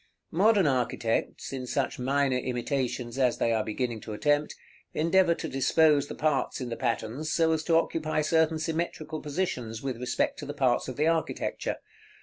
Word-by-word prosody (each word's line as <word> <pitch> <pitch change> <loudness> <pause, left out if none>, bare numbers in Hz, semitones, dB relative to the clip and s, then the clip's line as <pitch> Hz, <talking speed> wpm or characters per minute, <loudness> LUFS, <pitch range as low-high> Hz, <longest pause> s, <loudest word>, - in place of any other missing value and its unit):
Modern 200 +2 +4
architects, 125 -3 -1
in 130 -1 -4
such - - -1
minor 135 0 +1
imitations 125 0 -2
as 125 -2 +3
they 115 - +1
are 110 -1 +1
beginning 115 0 -3
to 110 - -7
attempt, 145 +6 +1 0.4
endeavor 170 +2 +3
to - - -5
dispose 145 +2 +3
the - - -7
parts 150 -3 0
in 125 -2 -4
the 115 - -3
patterns 125 +5 -2
so 165 -1 +3
as 160 0 0
to 165 - +3
occupy 155 -2 0
certain 160 0 +2
symmetrical 160 0 -3
positions 140 -8 -3
with 130 -3 -3
respect 125 0 -1
to - - -6
the 145 - -5
parts 130 -4 +2
of 130 - -5
the 150 - +2
architecture. 165 0 -1
140 Hz, 170 wpm, -28 LUFS, 125-160 Hz, 0.4 s, Modern